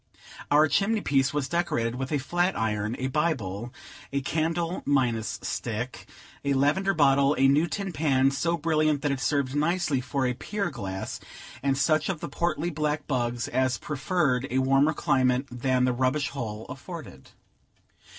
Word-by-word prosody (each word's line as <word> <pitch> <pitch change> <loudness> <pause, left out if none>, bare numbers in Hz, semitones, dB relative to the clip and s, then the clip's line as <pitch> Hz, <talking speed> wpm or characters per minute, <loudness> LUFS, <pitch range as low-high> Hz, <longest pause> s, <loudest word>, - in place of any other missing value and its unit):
Our 150 +2 +5
chimney 210 +7 +1
piece 135 -5 +2
was 145 -2 -1
decorated 125 -9 0
with 130 +3 -4
a 150 - +2
flat 175 +7 0
iron, 105 0 -1
a 130 - -3
Bible, 125 - -1 0.4
a 140 - 0
candle 165 +4 -1
minus 120 -6 +1
stick, 120 +2 -4 0.4
a 140 0 +1
lavender 175 +8 +2
bottle, 140 -1 +4
a 135 - +5
new 145 +5 +4
tin 195 +1 -3
pan, 135 -3 +3
so 170 +5 0
brilliant 155 -2 +1
that 145 - +1
it 135 - -1
served 140 -1 0
nicely 155 -3 +1
for 130 +1 -1
a 125 - +1
pier 200 - -3
glass, 95 -7 -5 0.4
and 135 0 +1
such 155 +4 +2
of 185 -5 -2
the 170 - -5
portly 170 0 -1
black 150 -1 -1
bugs 120 -3 -1
as 130 -1 +1
preferred 140 - 0
a 130 - -1
warmer 135 +3 +3
climate 130 -1 +2
than 125 +1 +1
the 125 - +1
rubbish 130 +3 0
hole 110 -5 -5
afforded. 135 - -9
140 Hz, 160 wpm, -27 LUFS, 130-155 Hz, 0.4 s, Our